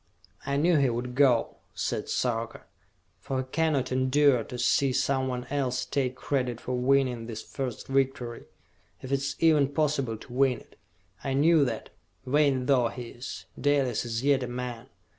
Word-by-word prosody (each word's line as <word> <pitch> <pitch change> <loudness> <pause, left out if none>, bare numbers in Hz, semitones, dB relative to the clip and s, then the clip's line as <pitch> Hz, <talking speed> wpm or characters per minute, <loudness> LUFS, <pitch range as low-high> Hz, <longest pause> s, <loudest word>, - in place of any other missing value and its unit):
"I 140 0 0
knew 165 +3 +4
he 140 -3 +3
would 120 +1 -3
go," 130 -3 +3 0.2
said - - -2
Sarka, 115 -2 -2 0.6
"for 135 - -3
he 130 - 0
cannot 150 -6 +1
endure 130 -1 +3
to 125 - -8
see 135 +2 +2
someone 130 -1 0
else 135 -3 -1
take 130 -2 -1
credit 125 -3 -2
for 125 - -4
winning 125 -2 +1
this 110 -2 -6
first 130 -4 -5
victory 135 -3 -1 0.6
if 130 - -6
it 140 - +2
is 140 +1 -3
even 155 -4 +4
possible 140 -5 0
to 120 - -12
win 130 -2 +2
it! - - -21 0.5
I 135 -1 -1
knew 155 +2 +5
that, 115 -4 -4 0.3
vain 135 -1 +2
though 130 -4 +3
he 120 0 -7
is, 120 +2 -8
Dalis 140 -5 +1
is 115 0 -3
yet 140 -1 +3
a 125 - -3
man!" 125 0 -5
130 Hz, 165 wpm, -28 LUFS, 125-140 Hz, 0.6 s, knew